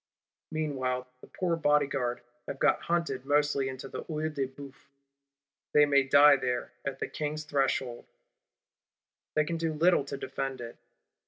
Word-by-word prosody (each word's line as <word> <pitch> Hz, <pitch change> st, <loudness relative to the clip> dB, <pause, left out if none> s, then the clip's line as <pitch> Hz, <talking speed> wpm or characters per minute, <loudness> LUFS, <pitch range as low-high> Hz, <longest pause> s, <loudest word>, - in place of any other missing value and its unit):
Meanwhile, 130 Hz, -5 st, -2 dB, 0.2 s
the -, -, -13 dB
poor 175 Hz, -2 st, -1 dB
Bodyguards 140 Hz, -6 st, +1 dB, 0.2 s
have 140 Hz, -, -5 dB
got -, -, +3 dB
hunted 170 Hz, -7 st, -1 dB
mostly 145 Hz, -1 st, +1 dB
into 130 Hz, 0 st, -7 dB
the -, -, -6 dB
Œil 155 Hz, -1 st, -3 dB
de 135 Hz, -3 st, -1 dB
Bœuf. 135 Hz, 0 st, -13 dB, 0.9 s
They 150 Hz, 0 st, +7 dB
may 140 Hz, -1 st, +4 dB
die 140 Hz, +2 st, +7 dB
there, 125 Hz, -2 st, -2 dB
at 135 Hz, -1 st, -3 dB
the -, -, -3 dB
King's 155 Hz, 0 st, -4 dB
threshhold; 135 Hz, -4 st, -1 dB, 1.3 s
they 155 Hz, -, +3 dB
can 165 Hz, +2 st, -2 dB
do 165 Hz, -1 st, -1 dB
little 170 Hz, 0 st, +3 dB
to 140 Hz, 0 st, -5 dB
defend 135 Hz, -1 st, -4 dB
it. 120 Hz, -1 st, -8 dB
140 Hz, 150 wpm, -29 LUFS, 130-150 Hz, 1.3 s, They